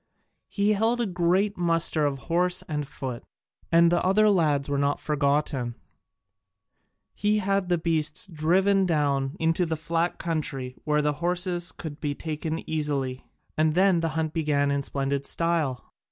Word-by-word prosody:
He 205 +1 +1
held 225 +4 +1
a 240 - +1
great 185 +2 +1
muster 165 -3 +2
of 140 -1 -2
horse 180 +2 +1
and 150 -3 -3
foot, 130 -4 -6 0.5
and 170 0 +5
the 175 - +2
other 210 +3 +4
lads 150 -7 +2
were 140 -1 -1
not 140 0 +1
forgotten: 140 -4 0 1.4
he 210 +1 +1
had 195 -2 0
the 175 - +3
beasts 160 -2 0
driven 190 +3 +2
down 140 -3 0
into 165 +2 +1
the 160 -2 -2
flat 165 +2 -1
country 140 -6 -3
where 150 -1 +2
the 150 0 +1
horses 175 0 -1
could 155 -3 -8
be 145 -2 -2
taken 160 +1 -4
easily, 140 -4 -2 0.3
and 155 0 +2
then 185 -1 +4
the 165 0 0
hunt 160 -1 -1
began 145 -3 +1
in 140 0 0
splendid 140 0 -2
style. 160 -8 -1
160 Hz, 155 wpm, -26 LUFS, 145-180 Hz, 1.4 s, and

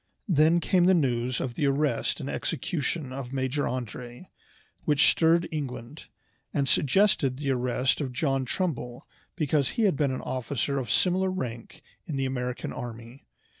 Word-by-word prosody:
Then 165 -1 +4
came 175 +1 +3
the 185 +1 +6
news 125 -5 0
of 125 - -3
the 145 - 0
arrest 140 -3 +1
and - - -5
execution 145 -3 -2
of 130 -2 -6
Major 135 +1 -1
André, 125 - -6 0.5
which 150 -3 +4
stirred 170 +1 +3
England, 135 -2 -5 0.5
and 140 -2 0
suggested 140 -3 +3
the 140 -1 -1
arrest 125 +2 +1
of 135 -3 -2
John 135 +1 0
Trumbull 125 -5 -3 0.3
because 145 -5 +1
he 230 - +3
had 195 -7 +3
been 140 0 +1
an 130 - -3
officer 135 +2 -2
of 125 -4 -5
similar 185 - +2
rank 120 -11 -5 0.2
in 155 - -3
the 135 - 0
American 125 -1 -3
army. 120 +1 -8
135 Hz, 155 wpm, -27 LUFS, 125-155 Hz, 0.5 s, the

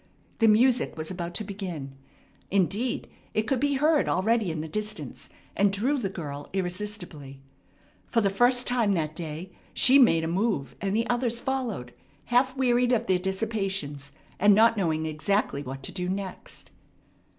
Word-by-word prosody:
The 225 - +5
music 235 -1 +3
was 155 +2 -4
about 175 -1 -5
to 220 - -1
begin. 180 -9 -6 0.5
Indeed, 200 +6 0 0.3
it 215 - +2
could 250 +3 0
be 285 +1 +1
heard 300 +2 +2
already 215 +2 +1
in 160 -1 -3
the 160 - -5
distance, 215 +5 -5 0.3
and 200 0 +3
drew 250 +9 0
the 200 -5 -2
girl 145 -6 -7
irresistibly. 180 -7 -4 0.7
For 230 - +1
the 200 -3 +2
first 245 +4 +4
time 235 -5 +3
that 155 -2 -2
day 165 +2 -6 0.2
she 270 +2 +7
made 165 -11 +5
a - - -1
move, 180 -4 -1
and 195 +1 -1
the 230 +1 +1
others 240 -1 0
followed, 240 - -3 0.3
half 255 +2 +2
wearied 245 -1 +2
of 235 -1 +1
their 185 -3 +2
dissipations, 190 -7 -3 0.3
and 205 +1 +6
not 225 +2 +5
knowing 160 -6 0
exactly 155 0 -1
what 135 -1 -7
to - - -3
do 180 -1 -3
next. 190 -1 -6
200 Hz, 160 wpm, -27 LUFS, 165-235 Hz, 0.7 s, she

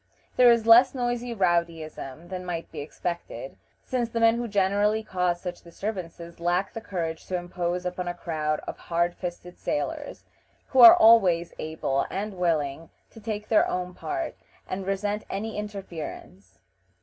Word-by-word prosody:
There 250 -1 +7
is 235 -1 +2
less 240 +4 +7
noisy 245 -1 -2
rowdyism 170 -4 -1
than 185 -1 -5
might 170 -2 -5
be 155 - -7
expected, 170 - -5 0.3
since 245 -3 -1
the 230 - -2
men 230 0 +5
who 240 0 -2
generally 205 +1 +2
cause 180 -3 -1
such 180 -1 -6
disturbances 170 -2 -6
lack 175 +3 0
the 225 - -6
courage 165 -6 -4
to 185 - -2
impose 175 0 -3
upon 180 0 -3
a 175 - -3
crowd 155 -3 -2
of - - -7
hard 170 +1 0
fisted 180 0 -7
sailors, 145 - -3 0.5
who 265 - +1
are 235 -2 +12
always 190 -7 +5
able 155 -3 -1
and 205 +2 -4
willing 160 -3 0 0.2
to 225 - -13
take 210 -1 -5
their 220 - +4
own 180 0 -3
part, 335 - -4 0.3
and 190 0 -4
resent 205 +2 -1
any 215 +3 -4
interference. 170 - -7
180 Hz, 155 wpm, -26 LUFS, 170-215 Hz, 0.5 s, are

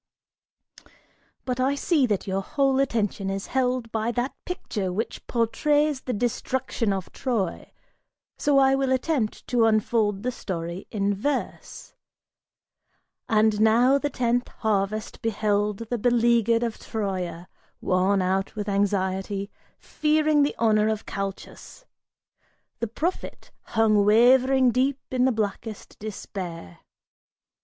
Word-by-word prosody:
"But 250 -1 -2
I 265 +2 +2
see 285 -2 +2
that 205 -4 -1
your 195 0 -1
whole 270 +5 +1
attention 215 -7 0
is 195 0 -3
held 250 -3 0
by 220 +1 -1
that 245 +4 -2
picture 210 - -3
which 215 +6 -4
portrays 290 +5 +1
the 255 - -4
destruction 245 0 -1
of 190 -2 -4
Troy, 225 -9 -3 0.6
so 285 -1 +2
I 270 0 +5
will 270 -1 +1
attempt 260 -3 -1
to 240 -2 +3
unfold 215 -2 +1
the 250 - 0
story 175 -5 -5
in 205 -2 0
verse: 265 +8 -4 1.4
And 215 -1 +3
now 240 +5 +5
the 290 - -1
tenth 245 -2 0
harvest 215 0 -2
beheld 210 -2 0
the 240 - 0
beleaguered 235 0 +3
of 230 -2 -3
Troia 185 -5 -4 0.3
Worn 185 +1 +2
out 190 +3 -1
with 210 -1 -4
anxiety, 195 0 -1 0.3
fearing 305 -1 +1
the 285 - +1
honor 215 -2 +3
of 220 -1 -2
Calchas 195 - -7 0.9
The 230 - -1
prophet, 325 - -4 0.3
hung 215 -2 +4
wavering 255 +4 +5
deep 265 +3 +1
in 255 -1 +2
the 260 - +3
blackest 215 -1 -4
despair. 180 - -7
225 Hz, 120 wpm, -25 LUFS, 200-255 Hz, 1.4 s, I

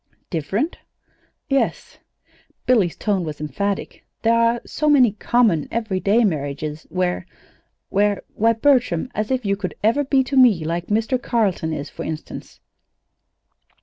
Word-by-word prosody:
"Different?" 195 - -2 0.7
"Yes." 275 -3 -1 0.7
Billy's 215 -9 +3
tone 200 -4 -1
was 155 -2 -6
emphatic. 195 +7 -3 0.2
"There 230 0 +4
are 230 +1 +3
so 305 0 -1
many 260 -6 +5
common, 215 -6 +1
everyday 220 0 +1
marriages 150 -3 -3
where 180 -1 -1 0.6
where 205 0 +1
Why, 225 +2 +3
Bertram, 250 - +2
as 215 0 -2
if 260 -3 -1
you 200 0 +1
could 195 -2 -5
ever 230 +7 +3
be 270 -1 +2
to 270 +2 -4
me 230 -11 +5
like 170 +2 -3
like 210 - +3
Mr. 245 +3 -1
Carleton 200 -10 0
is, 145 -2 -5
for - - -7
instance!" 160 -1 -7
210 Hz, 140 wpm, -21 LUFS, 170-240 Hz, 0.7 s, many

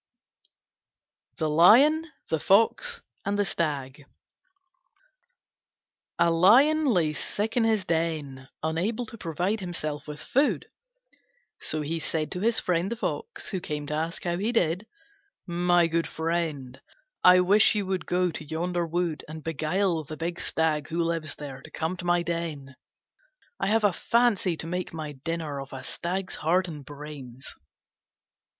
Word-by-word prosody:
THE 155 - 0
LION, 270 - +6 0.2
THE 160 - +1
FOX, 230 - +2 0.2
AND 205 0 -1
THE 205 - +2
STAG 145 -5 -2 2.1
A 170 - +4
Lion 260 - +5
lay 175 - +2
sick 205 +8 -2
in 240 -2 +3
his 220 -4 +1
den, 155 -6 -2
unable 185 +10 -1
to 230 - -11
provide 180 +6 -1
himself 155 -6 -4
with 150 0 -7
food. 280 +3 +1 0.9
So 155 - -2
he 160 +3 -2
said 155 0 -2
to 180 - -3
his 225 +3 +2
friend 180 +3 0
the - - -1
Fox, 445 - -4
who 190 - -1
came 150 -3 -4
to 150 - -4
ask 160 +3 -2
how 175 -1 -1
he 210 +5 0
did, 185 -2 +1 0.6
"My 175 -1 +3
good 165 0 0
friend, 160 -6 -3 0.4
I 180 0 +8
wish 205 +4 +5
you 205 -2 0
would 185 -1 -2
go 180 0 +1
to 160 - -6
yonder 170 +3 -2
wood 170 -1 -1
and 155 0 -8
beguile 165 +2 0
the 155 +2 -8
big 170 +2 -3
Stag, 155 -2 0
who 170 +1 -1
lives 165 -2 -2
there, 135 -3 -8
to - - -12
come 160 +3 -2
to 180 - -7
my 175 0 +2
den: 160 -6 -4 0.8
I - - 0
have 220 +2 +2
a 205 -3 +4
fancy 215 -8 +2
to - - -6
make 180 0 -4
my 155 -2 -5
dinner 150 0 -4
off 135 - -10
a 130 - -7
stag's 185 +2 -3
heart 180 +4 +2
and 150 -4 -7
brains." 140 -3 -9
170 Hz, 155 wpm, -27 LUFS, 155-190 Hz, 2.1 s, I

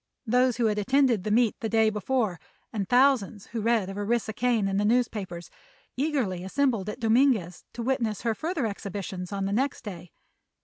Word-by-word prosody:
Those 250 +1 +2
who 240 - +1
had 210 -1 +1
attended 250 -2 +2
the 215 - -2
meet 225 +1 +3
the 225 - -3
day 220 -1 +3
before, 210 -3 -1 0.3
and 200 -4 -3
thousands 245 -6 +3
who 230 -1 -5
read 225 -3 +2
of 195 +1 -6
Orissa 220 +1 -1
Kane 230 -3 +1
in 195 0 -1
the 205 - +1
newspapers, 210 -7 -1 0.4
eagerly 255 - -1
assembled 225 -1 0
at 210 - -6
Dominguez 225 - +2
to 235 - -5
witness 230 -4 -1
her 230 -2 +1
further 315 - -2
exhibitions 195 -3 -5
on 195 -1 -2
the 195 - -1
next 265 +5 -1
day. 180 -5 -8
220 Hz, 180 wpm, -27 LUFS, 200-245 Hz, 0.4 s, meet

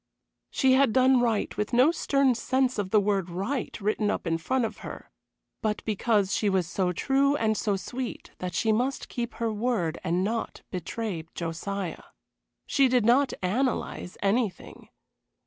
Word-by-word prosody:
She 265 -1 +3
had 260 -4 +4
done 260 0 +5
right 230 -3 0
with 210 +3 -3
no 255 +6 +6
stern 275 -5 +2
sense 255 0 0
of 195 -2 -2
the 215 - +5
word 195 -3 0
"Right" 200 +11 -3
written 210 0 0
up - - -2
in 165 -1 0
front 255 +8 0
of - - -5
her, - - -9 0.5
but 215 -1 -2
because 210 -2 +1
she 210 - +1
was 190 -2 +1
so 180 +2 -1
true 275 +8 +2
and 220 -5 +1
so 205 -1 0
sweet 245 +5 -5
that 180 -1 -4
she 220 - +2
must 250 +5 -1
keep 240 -1 -4
her 230 -2 -1
word 210 -7 -1
and 175 +3 +1
not 225 +3 -3
betray 180 -1 -4
Josiah. 175 +3 -4 0.6
She 275 -2 +3
did 250 -3 +2
not 260 +4 +4
analyze 220 -2 -1
anything. 200 -2 -1
220 Hz, 165 wpm, -27 LUFS, 190-255 Hz, 0.6 s, no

